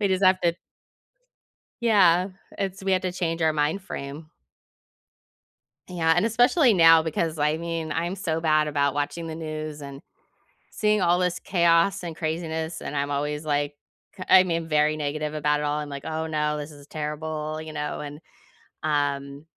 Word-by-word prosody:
We 205 - +2
just 190 0 +1
have 185 0 +5
to 170 -1 +2 1.3
Yeah, 185 -5 +4 0.3
it's 195 0 -3
we 190 0 0
have 185 - +2
to 185 -1 -2
change 165 -2 -2
our 160 - +3
mind 155 +5 0
frame. 155 -3 -7 1.6
Yeah, 165 -3 +1
and 175 - +3
especially 245 +3 +4
now 165 -3 +7
because, 160 0 -2
I 150 +1 +2
mean, 165 -2 -3
I'm 170 +3 -2
so 165 -4 -2
bad 155 -2 +2
about 140 -1 +1
watching 145 +3 -3
the 160 - -5
news 155 -2 -6
and 140 -1 -8 0.7
seeing 210 -1 +1
all 175 -1 +3
this 180 -1 0
chaos 170 0 +2
and 170 -2 -5
craziness, 160 0 -3
and - - -5
I'm 140 0 -1
always 150 +2 -2
like, 145 0 0 0.5
I 185 - +8
mean, 165 -2 -2
very 150 0 +2
negative 150 +1 -2
about 150 -1 +1
it - - -3
all. 145 0 0
I'm 150 -1 -5
like, 140 -1 -7
"Oh, 160 0 -3
no. 150 -1 -1
This 150 +1 -6
is 145 -1 -14
terrible," 155 0 -4
you 155 0 -8
know? 150 0 -4
And, 145 +1 -7 0.6
um 145 -1 -1
160 Hz, 170 wpm, -25 LUFS, 150-175 Hz, 1.6 s, I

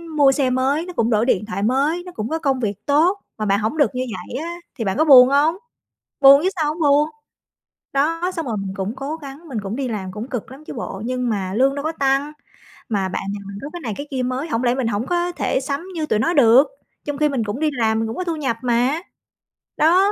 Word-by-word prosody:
mua 280 -2 +6
xe 270 -2 +1
mới, 270 +6 +1
nó 360 - -8
cũng 230 -6 +1
đổi 220 0 +2
điện 210 -5 +1
thoại 205 -2 -4
mới, 285 +9 +1
nó 360 - -8
cũng 220 -8 -4
có 320 - -1
công 270 -5 0
việc 205 -3 -3
tốt, 330 +8 +3 0.2
mà 215 - -2
bạn 200 +1 +2
hổng 225 +9 -2
được 265 -4 +2
như 255 - -1
vậy 240 - -7
á, 340 +1 -5 0.2
thì 225 - -4
bạn 190 - -1
có 315 - +3
buồn 255 -3 +9
hông? 295 +4 +3 0.7
Buồn 275 +1 +9
chứ 375 - +2
sao 300 - +2
hổng 335 - -10
buồn! 295 0 +4 0.9
Đó, 330 +6 +1
xong 330 -3 -3
rồi 225 -4 -2
mình 195 -1 -4
cũng 195 +5 -3
cố 280 +4 -4
gắng, 290 +1 -10
mình 245 -7 -3
cũng 200 +2 -4
đi 265 0 -2
làm 195 -5 -4
cũng 215 +6 -6
cực 245 +1 -5
lắm 280 +3 -12
chứ - - -7
bộ, 215 -4 -6
nhưng 250 -1 -1
mà 190 -3 -2
lương 270 +4 +2
đâu 285 - -4
có 315 - -1
tăng. 275 0 0 0.6
Mà 195 -4 0
bạn - - -3
nhà 205 - -5
mình 200 0 -8
có 285 - -6
cái 350 - -5
này 220 -5 -3
cái 290 - -6
kia 260 -2 -1
mới, 255 +5 -2
hổng 245 -5 -1
lẽ 240 0 +2
mình 255 -3 -1
hổng 215 +2 -1
có 350 0 0
thể 300 - -1
sắm 280 +5 -4
như 315 -2 -1
tụi 215 - 0
nó 335 +9 +1
được? 260 -1 +6 0.4
Trong 290 -1 -3
khi 300 0 +2
mình 255 -5 -1
cũng 210 +6 -4
đi 310 -1 +2
làm, 220 -3 +1
mình 225 - -1
cũng 225 - -5
có 365 - -1
thu 335 -2 -2
nhập 260 -7 -2
mà! 250 +5 +1 0.8
Đó! 365 +6 +4
270 Hz, 265 wpm, -21 LUFS, 225-300 Hz, 0.9 s, buồn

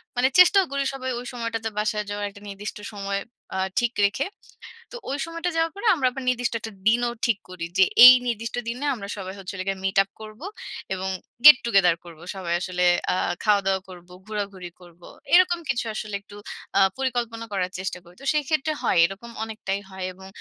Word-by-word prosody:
মানে 245 +1 +3
চেষ্টাও 380 +1 +7
করি 280 0 0
সবাই 260 -1 -4
ওই 245 - -8
সময়টাতে 230 -2 -3
বাসায় 210 0 0
যাওয়ার 205 0 -3
একটা 200 0 -15
নির্দিষ্ট 200 +1 -6 0.2
সময় 200 -1 -3 0.4
আ - - -1 0.2
ঠিক 240 -1 0
রেখে। 205 +7 0 0.7
তো - - -9
ওই 275 - -1
সময়টা 335 +1 -3
যাওয়ার 325 0 +1
পর 400 - -8
আমরা 270 -5 +1
আবার 265 +1 -6
নির্দিষ্ট 245 -1 0
একটা 220 0 -7 0.2
দিনও 240 +1 +3
ঠিক 230 -4 +2
করি। 180 -2 -6
যে 190 - +7 0.2
এই 250 - +13
নির্দিষ্ট 230 0 -3
দিনে 245 +5 -3
আমরা 200 -4 -8
সবাই 190 -1 -6
হচ্ছে 190 0 -7
হলো 185 - -4
গিয়ে 195 -1 -1
মিট 195 0 -1
আপ 195 - -24
করবো 215 +8 -10 0.5
এবং 190 0 -3 0.4
গেট 300 -3 +12
টু 235 - -1
গেদার 180 -3 +5
করবো 165 -2 -13
সবাই 180 -3 -3
আসলে। 180 0 -1 0.3
আ - - 0 0.3
খাওয়া-দাওয়া 195 -3 +2
করবো, 180 -1 -13
ঘোরাঘুরি 200 -4 -5
করবো। 175 -1 -16 0.3
এরকম 350 -1 +5
কিছু 240 -3 0
আসলে 210 -1 -4
একটু 205 0 -15 0.4
আ - - +6 0.2
পরিকল্পনা 240 -3 -2
করার 185 -2 -1
চেষ্টা 185 -1 -4
করি। 175 +1 -18
তো - - -10
সেইক্ষেত্রে 305 0 0
হয়। - - +2
এরকম 195 +6 -7
অনেকটাই 215 -3 -4
হয় 190 -1 -6
এবং 190 +1 -13
215 Hz, 195 wpm, -24 LUFS, 190-250 Hz, 0.7 s, এই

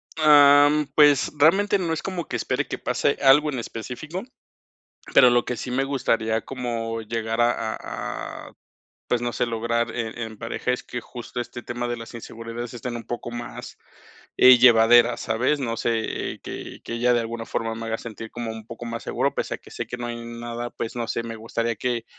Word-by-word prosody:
Am, 145 -1 +6
pues, 145 -2 +5
realmente 195 +7 +4
no 170 -4 -1
es 155 - -2
como 180 -3 -4
que - - -4
espere - - -1
que - - -4
pase - - 0
algo 145 +2 +6
en 130 - -3
específico, 125 - -6 0.9
pero 125 -2 +8
lo 120 0 +3
que 125 - -3
sí 125 - -5
me 135 +2 +1
gustaría 115 -5 0
como 115 -3 -4
llegar 115 +1 -2
a 120 - +4 0.2
a - - -6
a, - - -21 0.5
pues, 120 - +1
no 120 -1 -2
sé - - 0
lograr 115 0 -1
en 115 -1 -4
en 110 -2 -6
pareja 115 +2 -2
es 125 - -2
que 125 - -5
justo 120 +1 -8
este 120 0 -5
tema 120 0 -4
de 120 - -2
las 115 +1 -10
inseguridades 115 +1 -7
estén 120 0 -5
un 115 - -6
poco 120 +1 -5
más, 120 0 -7 0.6
eh, 130 -1 +9
llevaderas, 120 0 +6
¿sabes?, 125 +6 0
no 115 -4 -2
sé, 115 -1 0 0.3
eh, - - -14
que - - -8
que - - -5
ella 120 +1 +2
de 120 - +3
alguna 115 0 -4
forma 115 0 -2
me 115 0 -6
haga 115 0 -1
sentir 115 -1 -8
como 120 -1 -4
un 110 -1 -9
poco 115 +1 -8
más 115 0 -5
seguro - - 0
pese - - -2
a - - -14
que - - -17
sé - - -5
que 125 - -5
no 120 - -5
hay 120 - -4
nada, 120 0 -5
pues, 115 - -6
no 120 -1 -3
sé, - - -1
me 115 -1 -6
gustaría 115 +1 -2
que 120 +1 -2
120 Hz, 210 wpm, -24 LUFS, 115-125 Hz, 0.9 s, eh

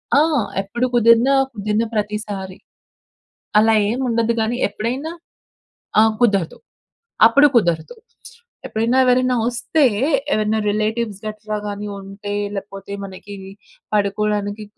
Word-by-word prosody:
ఆ! - - +6 0.4
ఎప్పుడు 235 +6 -2
కుదిరినా 235 +3 +5 0.2
కుదిరిన 210 +1 -1
ప్రతిసారి. 210 -3 -4 1.0
అలా 220 +1 +5 0.2
ఏం 240 +4 -2
ఉండదు 230 -1 +1
గానీ 220 +2 0
ఎప్పుడైనా 245 +9 -4 0.9
ఆ - - +7 0.2
కుదరదు. 200 -8 +1 0.7
అప్పుడు 280 +6 +6
కుదరదు. 175 - +1 0.7
ఎప్పుడైనా 230 +3 0
ఎవరైనా 255 0 +3
వస్తే 245 +6 0 0.5
ఎవరైనా 215 +1 +1
రిలేటివ్స్ 215 0 -2
గట్రా 215 0 -4
గాని 205 0 -5
ఉంటే 200 +1 -7 0.2
లేకపోతే 195 0 -8
మనకీ 195 +1 -9 0.6
పడుకోవడానికి 205 0 -1
215 Hz, 100 wpm, -20 LUFS, 205-235 Hz, 1.0 s, ఆ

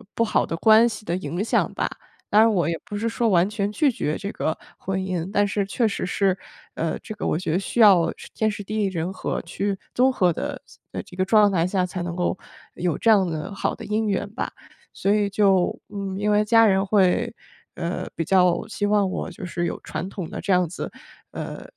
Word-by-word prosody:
不 230 - +2
好 210 - +1
的 165 - -4
关 220 +5 +6
系 215 -1 -8
的 170 - -1
影 185 0 -3
响 230 - +1
吧。 - - -1 0.4
当 210 +1 +6
然 225 - +5
我 175 -7 +1
也 170 - 0
不 205 - -6
是 225 +3 -1
说 230 0 +1
完 180 -2 +4
全 205 -1 -2
拒 285 +3 +2
绝 155 -8 -2
这 200 - -5
个 155 - -2 0.2
婚 190 0 -2
姻， 185 -2 -3
但 205 -1 +2
是 205 0 0
确 230 +3 +1
实 200 - -3
是， 190 +1 +1 0.4
呃， 165 0 -2
这 215 - -8
个 210 - -4
我 - - +1
觉 175 -2 -2
得 180 - +2
需 220 - -4
要 190 -7 +6 0.2
天 220 0 +1
时 205 -1 -5
地 215 +2 -5
利 210 - +2
人 180 0 -3
和 - - -3
去 200 -1 -2 0.2
综 260 +2 +4
合 180 -9 +2
的 - - -4 0.5
这 - - -13
个 185 - +1
状 210 0 +5
态 175 -2 +2
下， 185 -1 +1
才 180 0 -5
能 175 -1 -4
够 180 +1 0 0.4
有 175 -3 -1
这 230 - +4
样 195 -4 +4
的 165 +5 -4
好 200 - -2
的 - - -9
姻 215 +1 0
缘 200 0 -1
吧。 - - -3 0.4
所 200 +1 +1
以 205 -1 +2
就 195 -3 +2
嗯， 200 -2 -4
因 210 +1 +1
为 210 0 +4
家 225 +1 +5
人 195 -2 +3
会， 190 -3 +2 0.4
呃， 170 +1 -3
比 165 - -2
较 180 -1 +3
希 205 -1 -2
望 205 -1 +3
我 - - -3
就 180 +1 -8
是 175 -1 -2
有 - - -4
传 185 - -5
统 185 -4 -5
的 - - -5
这 - - -1
样 180 -1 +3
子 170 - -6 0.4
嗯， - - -6
195 Hz, 245 characters per minute, -24 LUFS, 180-210 Hz, 0.5 s, 关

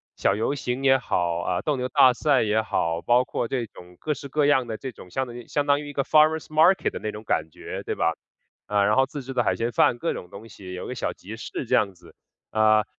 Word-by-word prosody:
小 100 - +1
游 115 +7 -1
行 125 0 -3
也 135 -1 +5
好， 85 -8 -1
呃， 90 - -1
斗 150 -2 0
牛 125 0 -3
大 125 0 +6
赛 140 -1 +2
也 110 +1 +2
好， 85 -4 -1
包 125 +4 +3
括 120 - -2
这 125 -2 -2
种 90 -3 -15
各 155 - -1
式 140 0 -9
各 150 +1 +1
样 130 -4 +3
的 110 -1 -4
这 130 -2 -6
种 90 - -14
相 130 +6 -2
当 120 - -9
于 120 - -10
相 145 -1 -1
当 145 0 +3
于 145 - -8
一 - - -8
个 140 - 0
forest 155 +2 +4
market 160 +5 +3
那 110 - -3
种 105 +1 -9
感 80 -5 0
觉 - - -7
对 - - -3
吧？ - - +1 0.5
呃， 100 -1 +2
然 105 - +3
后 135 0 +4
自 140 +1 -7
制 130 +1 -7
的 120 -1 +1
海 - - +1
鲜 115 +1 -1
饭， 120 - +3
各 165 - -1
种 90 - -8
东 105 +3 -11
西， 95 -3 -11
有 90 - -6
个 - - -5
小 - - -2
集 - - -10
市 - - -6
这 - - +2
样 100 -2 +2
子。 85 -1 -19 0.4
呃， 110 -1 +4
120 Hz, 330 characters per minute, -25 LUFS, 105-140 Hz, 0.5 s, 大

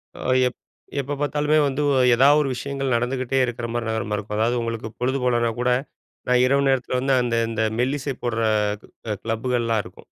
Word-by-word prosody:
அ - - -11 0.3
எப், 125 - -6 0.4
எப்போ 140 +1 -3
பாத்தாலுமே 150 +1 +1
வந்து 140 +2 -1 0.3
ஏதாவது 140 +4 +5
ஒரு 135 - -1
விஷயங்கள் 135 0 -2
நடந்துகிட்டே 130 +2 0
இருக்கிற 120 -1 -4
மாதிரி 115 -1 -2
நகரமா 110 -1 -2
இருக்கும். 105 +1 -5
அதாவது 120 +2 +1
உங்களுக்கு 115 -1 -4
பொழுது 130 +2 0
போலனா 120 -2 +2
கூட 125 0 +2 0.6
நான் 125 0 +4
இரவு 140 +1 +2
நேரத்தில 130 -1 0
வந்து 135 +1 +2
அந்த 120 -1 0
இந்த 115 -1 -3 0.2
மெல்லிசை 135 +2 -1
போடுற 115 -2 -1 0.8
கிளப்புகள்லாம் 115 -1 0
இருக்கும். 90 - -14
125 Hz, 165 wpm, -23 LUFS, 115-135 Hz, 0.8 s, ஏதாவது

